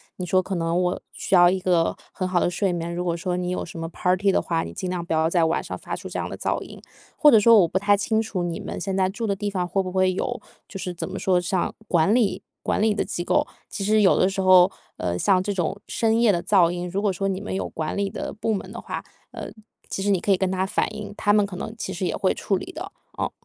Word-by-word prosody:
你 180 - -5
说 185 +1 +3
可 190 +1 -4
能 170 +1 0
我 180 0 0
需 - - 0
要 175 0 +7
一 190 - 0
个 180 -3 +2 0.2
很 185 - -3
好 185 -1 +1
的 - - +2
睡 180 +1 0
眠， 170 0 -3
如 180 +1 -2
果 170 -1 0
说 180 +1 -2
你 180 0 -2
有 180 - -2
什 170 0 -8
么 165 - -3
party 185 +3 +1
的 - - +2
话， 165 -1 -1
你 - - -7
尽 185 -3 -4
量 180 -2 -3
不 170 - -2
要 160 0 +2
在 170 -1 +3
晚 160 - 0
上 - - -6
发 - - -5
出 - - -8
这 - - -5
样 - - -2
的 - - -6
噪 - - -1
音。 - - -12 0.3
或 300 - +6
者 225 - +7
说 225 +1 +7
我 175 - +4
不 175 - -1
太 205 +1 +4
清 220 +2 0
楚 220 -4 -2
你 175 -1 -3
们 - - -6
现 195 -1 -2
在 190 -1 +3
住 220 +4 -3
的 200 - 0
地 205 +1 -3
方 180 -2 -1
会 190 +2 0
不 185 - -5
会 185 0 +2
有 245 +6 -3 0.3
就 195 - -8
是 180 0 -3
怎 - - -4
么 190 0 -5
说 185 -2 +2
像 180 +1 -1
管 175 +2 +3
理 235 -5 +1 0.2
管 - - 0
理 215 -1 +3
的 - - -1
机 175 - -3
构。 - - +1 0.2
其 200 - -4
实 215 +2 +3
有 190 - +5
的 185 - +4
时 195 0 -2
候， 185 0 +6 0.3
呃， 90 -1 -2
像 185 - +3
这 205 - -2
种 185 +1 -2
深 225 0 +1
夜 235 -3 +5
的 175 -3 0
噪 185 -5 +4
音， 175 0 -4
如 195 +3 -2
果 205 - +2
说 195 +2 -2
你 190 -1 -1
们 205 - -5
有 190 - -2
管 155 -1 -4
理 200 -1 0
的 - - -5
部 220 +1 -2
门 195 - -4
的 - - -7
话， - - -5 0.3
呃， - - -7 0.4
其 195 - -3
实 205 - +2
你 190 - +3
可 200 - 0
以 190 - +5
跟 185 0 0
他 190 0 0
反 190 - -1
映， 210 -1 -6
他 205 - +2
们 210 0 +4
可 200 -2 -5
能 215 - -5
其 200 -3 -5
实 185 0 -3
也 175 - -1
会 190 - +1
处 200 - -1
理 365 - -7
的。 - - -7 0.3
哦。 - - -1
185 Hz, 320 characters per minute, -24 LUFS, 175-200 Hz, 0.4 s, 要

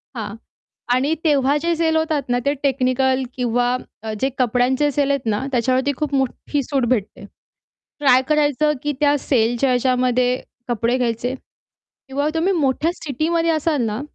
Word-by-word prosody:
हां. 210 -2 -5 0.6
आणि 280 +5 +1
तेव्हा 285 -2 +3
जे 335 +2 0
सेल 320 -1 +1
होतात 315 -3 0
ना, 245 0 +1
ते 285 - +3
टेक्निकल 265 -1 +1
किंवा 245 0 +1 0.3
अ, 220 -1 -4
जे 270 - +2
कपड्यांचे 255 +4 +2
साले 280 0 +1
आहेत 270 -4 -2
ना, 210 +6 -1
त्याच्यावरती 255 +3 +1
खूप 295 -2 -2
मोठी 275 +2 -1
सूट 270 -1 -1
भेटते. 225 -5 -2 0.8
ट्राय 260 -3 +5
करायचं 300 0 +2
की 295 0 -1
त्या 290 0 +4
सेलच्या 240 0 +1
ह्याच्यामध्ये 250 0 +1 0.3
कपडे 235 +1 0
घ्यायचे. 245 +1 -1 0.7
किंवा 285 +3 -1
तुम्ही 335 +4 +1
मोठ्या 305 0 +1
सिटीमध्ये 330 +2 -1
असाल 310 -3 0
ना, 215 +4 -3
265 Hz, 150 wpm, -20 LUFS, 245-295 Hz, 0.8 s, ट्राय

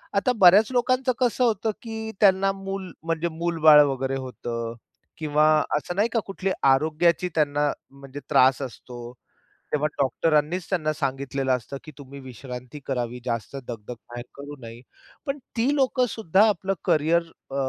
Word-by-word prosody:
आता 205 +6 +2
बऱ्याच 200 +6 +7
लोकांचं 255 +1 +1
कसं 250 0 +1
होतं, 220 -1 +1
की 220 -1 -6
त्यांना 195 -1 +4
मूल 195 -1 -6
म्हणजे 165 0 -1
मूलबाळ 160 -2 +5
वगैरे 135 -1 -2
होतं 115 -3 -5 0.4
किंवा 150 -1 +2 0.3
असं 175 +4 -5
नाही 215 +4 +2
का 230 - +3
कुठली 195 -1 -3
आरोग्याची 160 +6 +3
त्यांना 145 -1 +1 0.3
म्हणजे 140 +1 -9
त्रास 130 -1 +4
असतो. 120 -1 -8 0.6
तेव्हा 150 0 +1
डॉक्टरांनीच 155 +6 +1
त्यांना 155 -5 0
सांगितलेलं 135 -2 -2
असतं, 125 +4 -8
की 155 - -9
तुम्ही 140 0 -10
विश्रांती 125 +1 -9
करावी, 125 -2 -3
जास्त 115 +2 -3
दगदग 115 0 -7
बाहेर 120 0 -7
करू 145 +1 -9
नये. 115 +1 -9 0.5
पण 275 +1 -2 0.2
ती 255 +6 +2
लोक 265 -2 +1
सुद्धा 210 -1 +3
आपलं 195 -1 -1
कॅरियर 165 0 +3 0.3
अ, 135 - -7
155 Hz, 145 wpm, -24 LUFS, 135-195 Hz, 0.6 s, बऱ्याच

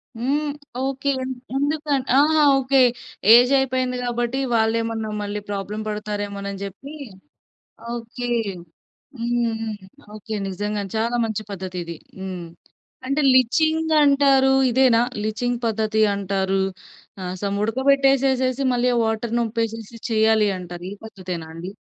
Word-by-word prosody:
హ్మ్. 285 +6 -1 0.3
ఓకే. 275 +1 -2
ఏంద్ 260 0 -3 0.2
ఎందుకంటే 285 -2 -1
ఆ! - - +7 0.4
ఓకే 270 0 +3 0.5
ఏజ్ 245 +2 +7
అయిపెయింది 255 -1 0
కాబట్టి, 240 +2 -1 0.2
వాళ్ళేమన్నా 225 0 0
మళ్ళీ 205 0 -3
ప్రాబ్లమ్ 205 +2 -4
పడతారేమో‌నని 205 -2 -4
జెప్పి, 225 +10 -8 1.0
ఓకే. 240 +1 -5 0.9
హ్మ్, 235 -1 0
హ్మ్. 220 -1 -3 0.4
ఓకే. 215 +1 -6
నిజంగా 205 +2 -3
చాలా 230 +2 0
మంచి 220 -1 -3
పద్ధతి 185 -1 -6
ఇది. 170 -1 -7 0.2
హ్మ్. 185 -2 -5 0.6
అంటే 275 +3 +1
లిచింగ్ 315 +6 +2
అంటారు 275 -2 +4 0.2
ఇదేనా? 240 -2 +4 0.2
లిచింగ్ 235 +3 -1
పద్ధతి 220 0 0
అంటారు. 195 -1 0 0.6
ఆ - - -5 0.2
సమ్ 200 -1 -1
ఉడకబెట్టేసేసేసి 265 +1 +2
మళ్ళీ 245 +1 +2
ఆ - - +1
వాటర్ 225 +1 -2
నొంప్పేసేసేసి 225 0 -3
చెయ్యాలి 220 -1 +4
అంటారు. 175 -1 -8
ఈ - - -5
పద్ధతేనా 185 -6 -6
అండి? 170 +3 -7
230 Hz, 120 wpm, -22 LUFS, 205-260 Hz, 1.0 s, ఆ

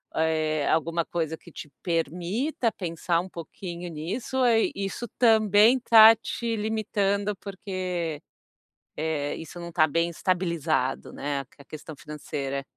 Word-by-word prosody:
eh, 155 -2 +1
alguma 165 +1 +1
coisa 160 -1 -2
que - - -16
te 150 - -9
permita 180 - -1
pensar 170 -2 -1
um 180 - -4
pouquinho 175 +1 -7
nisso? 175 +12 -4
Ou, 260 - +3
eh, 225 -2 +3
isso 195 +4 -4
também 220 0 +5
tá 225 -1 +9
te 230 +1 -3
limitando, 210 -2 0
porque, 185 -5 -4 0.7
eh, 150 -2 -2
isso 165 +2 -9
não 170 0 -7
tá 160 -2 +4
bem 165 +3 +1
estabilizado, 170 -7 -1
né, 140 0 -3 0.2
a 140 - -15
questão 155 +1 -9
financeira? 140 -2 -5
170 Hz, 130 wpm, -26 LUFS, 155-205 Hz, 0.7 s, tá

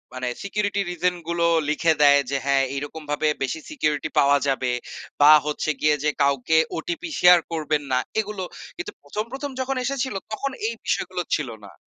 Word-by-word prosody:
মানে 130 -1 -2
security 200 0 -1
reason 180 +1 0
গুলো 170 0 0 0.2
লিখে 160 +2 +2
দেয়। 145 -1 +7
যে 140 - +1
হ্যাঁ 140 -1 +3
এইরকমভাবে 150 +1 -3 0.2
বেশি 135 +4 -2
সিকিউরিটি 150 - -1
পাওয়া 140 0 +5
যাবে। 130 -2 0 0.5
বা 150 +1 +9
হচ্ছে 150 +1 -2
গিয়ে 150 0 +4
যে 150 - +3
কাউকে 140 +3 +2 0.2
ওটিপি 340 -1 -4
শেয়ার 180 0 +8
করবেন 155 -2 0
না 125 - +3 0.2
এগুলো। 210 -2 -3 0.3
কিন্তু 355 - -5
১ম 175 +9 -4
১ম 275 +2 -5
যখন 265 +1 -1
এসেছিল 265 -3 -2 0.2
তখন 275 +6 -2 0.2
এই 230 - -2
বিষয়গুলো 185 -1 -1
ছিল 150 -5 -3 0.2
না। 100 - -13
160 Hz, 165 wpm, -23 LUFS, 145-210 Hz, 0.5 s, বা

